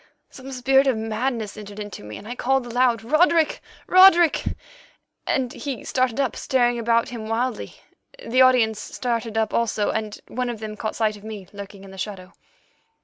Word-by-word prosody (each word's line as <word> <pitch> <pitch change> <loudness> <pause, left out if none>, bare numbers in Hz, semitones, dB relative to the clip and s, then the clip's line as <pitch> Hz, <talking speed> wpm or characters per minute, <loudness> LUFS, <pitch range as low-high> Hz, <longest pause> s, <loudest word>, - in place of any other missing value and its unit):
Some 265 0 -10
spirit 265 +2 +3
of 255 -4 +2
madness 220 0 -2
entered 205 -1 -9
into 205 - -7
me, 105 0 -8
and 205 - -11
I 240 - -4
called 265 +1 0
aloud, 240 -1 +1
'Roderick, 315 +5 +3 0.2
Roderick!' 360 -3 +6 0.8
and 255 -2 0
he 275 -5 -5
started 255 -1 0
up, 270 -3 0
staring 245 -3 +1
about 230 +1 +2
him 230 -3 -6
wildly. 235 +1 -2 0.4
The 255 - +1
audience 240 -4 +4
started 230 -3 -3
up 220 -1 0
also, 215 -3 +1
and 215 -1 -3
one 250 0 -3
of 235 -3 -5
them 215 -1 -6
caught 215 +1 -4
sight 215 -2 0
of 205 - -16
me 215 -4 -8
lurking 200 -1 -9
in 195 - -12
the 190 - -11
shadow. 190 -2 -6
235 Hz, 175 wpm, -23 LUFS, 215-255 Hz, 0.8 s, Roderick